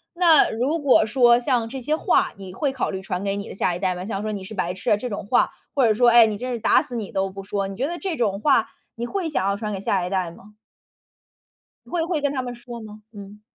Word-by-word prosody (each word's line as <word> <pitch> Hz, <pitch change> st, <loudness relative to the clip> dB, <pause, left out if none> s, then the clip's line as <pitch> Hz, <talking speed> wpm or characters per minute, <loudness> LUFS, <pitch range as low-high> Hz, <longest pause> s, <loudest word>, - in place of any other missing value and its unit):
那 340 Hz, -4 st, +5 dB
如 265 Hz, +9 st, -1 dB
果 275 Hz, -7 st, +4 dB
说 240 Hz, +1 st, +4 dB
像 245 Hz, -3 st, 0 dB
这 260 Hz, +3 st, -7 dB
些 300 Hz, +5 st, 0 dB
话 350 Hz, -, +1 dB
你 190 Hz, -2 st, -9 dB
会 280 Hz, +7 st, -1 dB
考 265 Hz, -, -2 dB
虑 190 Hz, -1 st, -5 dB
传 185 Hz, 0 st, -4 dB
给 200 Hz, 0 st, -1 dB
你 200 Hz, 0 st, -6 dB
的 -, -, -8 dB
下 180 Hz, -2 st, 0 dB
一 -, -, -6 dB
代 185 Hz, -1 st, 0 dB
吗？ 180 Hz, +1 st, -6 dB
像 200 Hz, -2 st, -3 dB
说： 215 Hz, 0 st, -3 dB
“你 200 Hz, -2 st, -5 dB
是 190 Hz, -, -9 dB
白 180 Hz, -4 st, -2 dB
痴 185 Hz, -, -2 dB
啊” 210 Hz, -, +5 dB
这 250 Hz, +4 st, -5 dB
种 205 Hz, -, -5 dB
话， -, -, +3 dB, 0.2 s
或 270 Hz, -3 st, +3 dB
者 220 Hz, -, +4 dB
说， 240 Hz, +3 st, +4 dB
诶， 235 Hz, -1 st, +7 dB
“你 210 Hz, -1 st, -3 dB
真 250 Hz, +3 st, -4 dB
是 235 Hz, -, -3 dB
打 225 Hz, -, +4 dB
死 245 Hz, -, -8 dB
你 220 Hz, -4 st, -4 dB
都 195 Hz, 0 st, -1 dB
不 195 Hz, +1 st, -9 dB
说，” 195 Hz, 0 st, -2 dB
你 195 Hz, -, -7 dB
觉 255 Hz, +7 st, -1 dB
得 345 Hz, +2 st, -4 dB
这 370 Hz, -2 st, -3 dB
种 205 Hz, -7 st, 0 dB
话 250 Hz, -2 st, +3 dB, 0.3 s
你 235 Hz, -, -4 dB
会 380 Hz, +4 st, -2 dB
想 275 Hz, -11 st, -1 dB
要 200 Hz, -, +1 dB
传 210 Hz, 0 st, -4 dB
给 195 Hz, -, -4 dB
下 190 Hz, -2 st, 0 dB
一 -, -, -4 dB
代 185 Hz, -2 st, -1 dB
吗？ 200 Hz, +5 st, -16 dB, 1.4 s
会 345 Hz, -, 0 dB
会 335 Hz, -3 st, -1 dB
跟 285 Hz, -1 st, +1 dB
他 265 Hz, -, -1 dB
们 245 Hz, -1 st, -6 dB
说 240 Hz, 0 st, -9 dB
吗？ 215 Hz, 0 st, -11 dB
嗯。 205 Hz, -1 st, -11 dB
220 Hz, 295 characters per minute, -23 LUFS, 195-255 Hz, 1.4 s, 诶